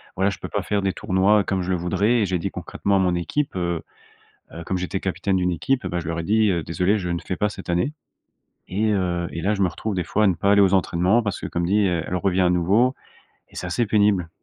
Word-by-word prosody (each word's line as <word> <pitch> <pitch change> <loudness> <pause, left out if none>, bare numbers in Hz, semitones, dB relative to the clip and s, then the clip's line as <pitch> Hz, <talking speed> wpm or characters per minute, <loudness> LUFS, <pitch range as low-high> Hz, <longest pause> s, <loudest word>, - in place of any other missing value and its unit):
voilà, 95 +2 +2
je - - -7
peux - - -7
pas - - -1
faire 100 -1 0
des 95 -1 0
tournois, 100 +3 +2
comme 95 -1 -1
je 90 - -5
le 90 - +1
voudrais 100 +7 +1
et - - +2
j'ai 95 -1 -1
dit - - -2
concrètement 100 0 -2
à - - +3
mon 90 -2 +2
équipe, 115 - -2
heu, 85 -2 -1 0.7
heu, 85 0 -7
comme 95 - -1
j'étais 90 +1 -3
capitaine 95 0 -1
d'une 90 0 +1
équipe, 130 +10 0
eh - - -2
bah, 85 -1 -2
je 80 - -8
leur 85 0 -2
ai - - -3
dit, 110 +2 +3
heu: 85 - 0
«Désolé, 90 +5 +1
je 90 - -4
ne 85 -1 -1
fais 90 - -3
pas 105 - +1
cette 95 -3 -10
année» 90 +12 0 0.8
et 105 +3 0
heu 90 -3 0
et 85 - -5
là, 105 +4 +1
je 100 - -1
me 95 - +3
retrouve 100 +5 -4
des 90 - -1
fois 105 - 0
à - - +5
ne 90 - +2
pas 100 +4 +2
aller 100 - +5
aux 95 0 +4
entraînements 95 +4 +2
parce 105 - -3
que, - - -4
comme 85 0 -2
dit, 105 +2 +3
heu, 85 -2 -1
elle - - -4
revient 95 +1 +1
à 90 - +3
nouveau 100 +9 +2 0.6
et - - -20
c'est 90 - -5
assez 115 +7 0
pénible. 100 -5 +2
95 Hz, 280 wpm, -23 LUFS, 90-105 Hz, 0.8 s, à